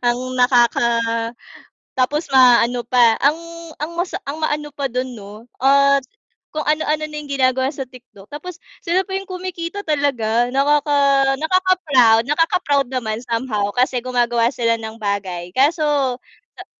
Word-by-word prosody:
Ang 255 Hz, +1 st, -1 dB
nakaka 245 Hz, -1 st, +3 dB, 1.1 s
tapos 295 Hz, +5 st, 0 dB
ma-ano 245 Hz, -2 st, +5 dB
pa, 235 Hz, -3 st, +4 dB
ang 290 Hz, +3 st, +3 dB, 0.4 s
ang 305 Hz, +3 st, -5 dB
masa 350 Hz, +2 st, -3 dB
ang 290 Hz, +3 st, -6 dB
maano 295 Hz, -1 st, -2 dB
pa 280 Hz, -1 st, -3 dB
dun 255 Hz, +1 st, -3 dB
'no, 210 Hz, 0 st, -11 dB, 0.2 s
at 280 Hz, +1 st, +4 dB, 0.5 s
kung 305 Hz, 0 st, -4 dB
ano-ano 305 Hz, 0 st, 0 dB
na 300 Hz, -, -9 dB
yung 295 Hz, -, -11 dB
ginagawa 260 Hz, -1 st, +1 dB
sa 275 Hz, -2 st, -6 dB
TikTok 245 Hz, -6 st, -16 dB
tapos 340 Hz, +4 st, -8 dB, 0.3 s
sila 365 Hz, +3 st, 0 dB
pa 380 Hz, -, -6 dB
yung 390 Hz, 0 st, -4 dB
kumikita 365 Hz, +1 st, -6 dB
talaga 245 Hz, -6 st, 0 dB
nakaka 290 Hz, +2 st, +1 dB, 0.4 s
nakaka-proud, 315 Hz, -9 st, +3 dB
nakaka-proud 295 Hz, -2 st, +1 dB
naman 230 Hz, -4 st, -3 dB
somehow 230 Hz, -4 st, -2 dB
kasi 250 Hz, 0 st, +1 dB
gumagawa 240 Hz, -2 st, +1 dB
sila 230 Hz, -3 st, -1 dB
ng 220 Hz, 0 st, -7 dB
bagay 190 Hz, -4 st, -4 dB
kaso, 300 Hz, -, +2 dB, 0.3 s
ah, -, -, -18 dB
265 Hz, 140 wpm, -19 LUFS, 240-305 Hz, 1.1 s, ma-ano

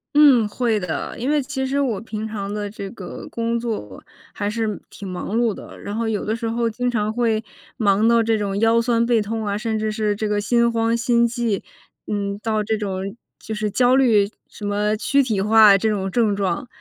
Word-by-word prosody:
嗯， 275 Hz, -7 st, +6 dB
会 230 Hz, -2 st, 0 dB
的。 170 Hz, -6 st, -4 dB
因 250 Hz, +4 st, -1 dB
为 300 Hz, 0 st, +3 dB
其 265 Hz, 0 st, -3 dB
实 275 Hz, +2 st, 0 dB
我 235 Hz, -8 st, 0 dB
平 220 Hz, -1 st, -5 dB
常 200 Hz, -2 st, -5 dB
的 205 Hz, 0 st, -3 dB
这 200 Hz, -1 st, -7 dB
个 190 Hz, -6 st, -8 dB
工 230 Hz, 0 st, -1 dB
作 215 Hz, -, -5 dB, 0.3 s
还 205 Hz, 0 st, -2 dB
是 215 Hz, -2 st, -2 dB
挺 200 Hz, -, -9 dB
忙 185 Hz, +4 st, -3 dB
碌 235 Hz, -3 st, +2 dB
的， -, -, -11 dB
然 205 Hz, -, -6 dB
后 225 Hz, 0 st, -1 dB
有 210 Hz, -2 st, -2 dB
的 215 Hz, +2 st, 0 dB
时 230 Hz, 0 st, -3 dB
候 235 Hz, 0 st, 0 dB
经 245 Hz, +3 st, -1 dB
常 215 Hz, -3 st, -1 dB
会 225 Hz, -2 st, +1 dB, 0.3 s
忙 210 Hz, -1 st, +3 dB
到 230 Hz, -1 st, +4 dB
这 225 Hz, 0 st, +2 dB
种 200 Hz, -1 st, -2 dB
腰 225 Hz, +1 st, +4 dB
酸 235 Hz, -1 st, +2 dB
背 235 Hz, -2 st, +3 dB
痛 220 Hz, +1 st, -3 dB
啊， 200 Hz, -1 st, -1 dB
甚 220 Hz, 0 st, -2 dB
至 215 Hz, 0 st, -1 dB
是 215 Hz, -1 st, 0 dB
这 215 Hz, +1 st, -2 dB
个 210 Hz, 0 st, 0 dB
心 235 Hz, +2 st, +2 dB
慌、 230 Hz, 0 st, +1 dB
心 235 Hz, 0 st, +3 dB
悸。 230 Hz, -4 st, -2 dB, 0.4 s
嗯， 200 Hz, -1 st, -2 dB
到 215 Hz, -1 st, -1 dB
这 220 Hz, +1 st, 0 dB
种 195 Hz, -1 st, -4 dB, 0.2 s
就 220 Hz, -, -7 dB
是 210 Hz, 0 st, -1 dB
焦 250 Hz, +4 st, +3 dB
虑， 225 Hz, -7 st, +4 dB, 0.2 s
什 210 Hz, -, -9 dB
么 210 Hz, +1 st, 0 dB
躯 280 Hz, +5 st, +2 dB
体 225 Hz, -7 st, 0 dB
化， 210 Hz, 0 st, +7 dB
这 220 Hz, +3 st, 0 dB
种 195 Hz, -3 st, -1 dB
症 215 Hz, 0 st, +2 dB
状。 195 Hz, +2 st, -2 dB
220 Hz, 230 characters per minute, -21 LUFS, 205-235 Hz, 0.4 s, 化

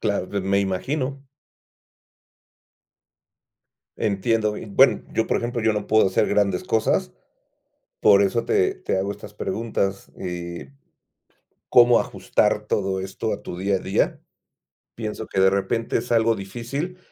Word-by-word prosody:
Claro. 100 Hz, -3 st, -1 dB
De 100 Hz, +1 st, -3 dB
me 95 Hz, +1 st, +1 dB
imagino. 135 Hz, +8 st, -2 dB, 2.7 s
Entiendo, 105 Hz, +1 st, 0 dB
y -, -, -7 dB
bueno, 130 Hz, +6 st, +4 dB
yo 110 Hz, -, 0 dB
por -, -, +1 dB
ejemplo, 120 Hz, 0 st, -2 dB
yo 110 Hz, 0 st, +3 dB
no 105 Hz, -1 st, -3 dB
puedo 110 Hz, -2 st, +4 dB
hacer 95 Hz, -, +2 dB
grandes 105 Hz, -, +1 dB
cosas, 110 Hz, -11 st, 0 dB, 0.9 s
por 100 Hz, -1 st, +6 dB
eso 110 Hz, +4 st, 0 dB
te 390 Hz, -2 st, +2 dB
te 380 Hz, -, -2 dB
hago 95 Hz, +1 st, -1 dB
estas 105 Hz, 0 st, -10 dB
preguntas, 100 Hz, -2 st, -3 dB
eh, 85 Hz, -5 st, -6 dB, 1.0 s
¿cómo 120 Hz, 0 st, +6 dB
ajustar -, -, 0 dB
todo 95 Hz, -1 st, -1 dB
esto 95 Hz, +4 st, -3 dB
a -, -, -5 dB
tu 90 Hz, -, -7 dB
día 95 Hz, +2 st, 0 dB
a -, -, -1 dB
día? -, -, 0 dB, 0.8 s
Pienso 110 Hz, -1 st, -5 dB
que -, -, -2 dB
de 95 Hz, 0 st, +6 dB
repente 105 Hz, +4 st, -1 dB
es 120 Hz, +1 st, -5 dB
algo 115 Hz, -1 st, +3 dB
difícil, 120 Hz, -, -5 dB
105 Hz, 140 wpm, -23 LUFS, 95-120 Hz, 2.7 s, por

